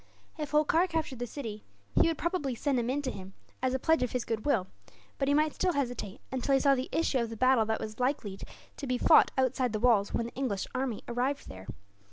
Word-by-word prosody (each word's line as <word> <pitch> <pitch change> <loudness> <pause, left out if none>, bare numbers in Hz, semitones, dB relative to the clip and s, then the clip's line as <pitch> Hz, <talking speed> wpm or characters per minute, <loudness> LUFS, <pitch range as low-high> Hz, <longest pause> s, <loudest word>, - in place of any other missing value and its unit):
If 300 -3 -4
Holkar 305 +4 +3
captured 315 -7 -3
the 245 - -3
city, 220 -5 -6 0.3
he - - +4
would 330 - 0
probably 340 -7 -1
send 270 +1 0
him 240 0 -1
in 285 +3 -1
to 260 - -2
him 190 -2 -9 0.3
as 260 0 +1
a - - +2
pledge 320 +5 +2
of 250 - -1
his 250 -1 -1
goodwill; 225 -2 0 0.5
but 275 - +1
he 285 - +3
might 305 0 +2
still 365 -1 0
hesitate, 245 -8 -3
until 265 +1 +1
he - - +4
saw 280 0 +4
the 260 0 -2
issue 310 -5 +1
of 235 -1 -1
the 225 - -7
battle 255 -1 +4
that 220 - 0
was 215 +1 -6
likely 250 -7 -1 0.4
to 280 - -5
be 250 0 +1
fought - - +6
outside 255 -2 +1
the 215 - -1
walls, 220 -4 +3
when 235 - -1
the 235 - -7
English 245 -8 -2
army 255 -4 -2
arrived 255 +4 -2
there. 95 +1 -10
255 Hz, 235 wpm, -30 LUFS, 230-285 Hz, 0.5 s, fought